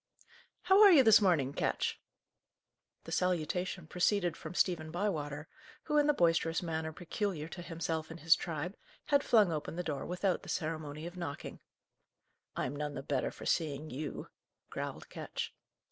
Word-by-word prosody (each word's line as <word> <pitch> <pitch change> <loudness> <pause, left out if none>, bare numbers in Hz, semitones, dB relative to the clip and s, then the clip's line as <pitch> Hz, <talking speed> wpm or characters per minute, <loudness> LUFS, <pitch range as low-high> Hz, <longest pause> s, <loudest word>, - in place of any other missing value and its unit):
"How 380 +3 +6
are 410 -2 +10
you 295 -7 +8
this 220 -2 +7
morning, 155 -9 +2
Ketch?" - - -1 1.0
The - - -9
salutation 180 0 -1
proceeded 180 +1 +1
from - - -8
Stephen 165 -4 +1
Bywater, 155 -5 -2 0.4
who, 300 -1 +2
in 295 - +3
the 295 - +5
boisterous 165 -2 +2
manner 160 -1 -2
peculiar 175 -1 -3
to 175 - -7
himself 165 -2 -3
and 165 +1 -8
his 160 0 +6
tribe, 170 +4 -4 0.3
had 285 -1 +3
flung 210 -6 +5
open 155 0 -3
the 180 - -2
door 150 -5 -3
without 180 +1 0
the - - -11
ceremony 155 -2 -3
of 175 +1 -7
knocking. 165 -5 -6 1.0
"I'm 130 - -2
none 150 0 -3
the - - -5
better 135 -2 0
for - - -10
seeing 155 -2 -1
you," 145 +3 -5 0.4
growled - - -5
Ketch. - - -5
165 Hz, 160 wpm, -33 LUFS, 155-185 Hz, 1.0 s, are